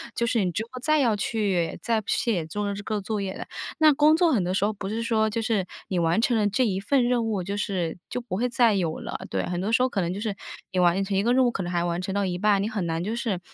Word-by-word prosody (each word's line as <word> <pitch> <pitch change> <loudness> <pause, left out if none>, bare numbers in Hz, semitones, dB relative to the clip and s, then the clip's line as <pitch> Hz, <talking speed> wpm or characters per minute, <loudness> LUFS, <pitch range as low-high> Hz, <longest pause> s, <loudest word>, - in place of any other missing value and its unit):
就 235 - +1
是 225 -4 +2
你 180 - 0
之 215 - -2
后 255 +2 -9
再 310 +2 +3
要 235 -6 +3
去 200 -5 -1
再 230 -2 +1
不 200 - -27
写 195 -9 +1
做 200 +5 -3
这 205 - -7
个 210 0 -2
作 210 +1 -3
业 190 -1 -3
的。 - - -7 0.3
那 310 -2 +6
工 300 +2 +5
作 335 -1 +3
很 210 -9 +2
多 180 - -1
时 190 - +1
候， 210 - +1
不 195 -1 -6
是 220 +2 -2
说 220 -2 +1
就 225 +2 -2
是 220 -5 0 0.2
你 185 - -2
完 170 +6 +2
成 235 -1 +2
了 210 -1 +2
这 235 +6 +1
一 190 -4 0
份 255 +6 +2
任 240 -2 +1
务， 205 -5 -1
就 200 +2 -3
是 180 -5 -2
就 - - -3
不 235 -6 -5
会 250 +3 +1
再 235 -3 +3
有 170 -5 -1
了， - - -5
对， - - -1
很 175 -1 -2
多 205 - -1
时 230 - +3
候 255 - +3
可 200 - -2
能 175 0 -1
就 195 - -5
是 210 -3 -2 0.4
你 185 - 0
完 180 +2 +3
成 195 0 -1
一 200 - +2
个 240 - +3
任 260 0 +4
务， 240 - +2
可 195 - -3
能 175 - -4
还 175 -1 0
完 175 0 -1
成 190 +1 -4
到 200 0 0
一 180 -1 -2
半， 205 0 +3
你 210 - -1
很 210 -6 -2
难 165 0 -2
就 215 +5 -2
是 225 -6 -2
205 Hz, 330 characters per minute, -25 LUFS, 185-230 Hz, 0.4 s, 那